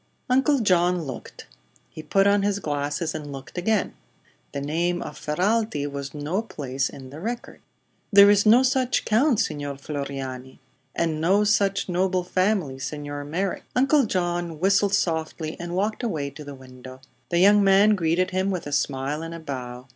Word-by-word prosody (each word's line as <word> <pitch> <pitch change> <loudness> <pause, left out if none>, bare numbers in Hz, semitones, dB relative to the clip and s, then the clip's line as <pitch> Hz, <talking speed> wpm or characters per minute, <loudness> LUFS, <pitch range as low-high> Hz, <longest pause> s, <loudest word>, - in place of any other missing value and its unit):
Uncle 270 +3 +3
John 180 -3 +2
looked. 135 -4 -8 0.5
He - - -8
put 195 +5 +2
on 200 0 +4
his 200 0 0
glasses 145 -1 -2
and 150 -2 -6
looked 135 -1 -10
again. 200 +3 0 0.6
The 140 - -4
name 170 +5 -1
of 150 - -7
Ferralti 185 0 0
was 140 0 -6
no 150 +8 -2
place 135 - -3
in 130 -1 -11
the 145 - -9
record. 235 +6 -6 0.5
"Then 200 -1 +9
there 205 - +7
is 205 0 +4
no 230 +4 +6
such 260 -1 +1
count, 235 +2 +3
Signor 145 -8 -3
Floriano." 135 -2 -6 0.4
"And 160 -2 -1
no 195 +5 +3
such 200 -1 +1
noble 185 0 0
family, 185 -7 0
Signor 145 +1 -5
Merrick." 180 +6 -2
Uncle 275 0 +3
John 175 -4 -2
whistled 200 +2 +3
softly 160 -3 -2
and 175 0 -5
walked 210 +5 -1
away 155 - -2
to 150 +2 -10
the 145 -1 -9
window. 130 0 -13 0.3
The 170 - 0
young 200 +3 +6
man 200 +2 +5
greeted 180 0 +1
him 190 +1 0
with 185 -3 -3
a 145 - -6
smile 140 +1 -1
and 165 +1 -6
a - - -7
bow. 125 -5 -7
170 Hz, 170 wpm, -24 LUFS, 145-200 Hz, 0.6 s, Then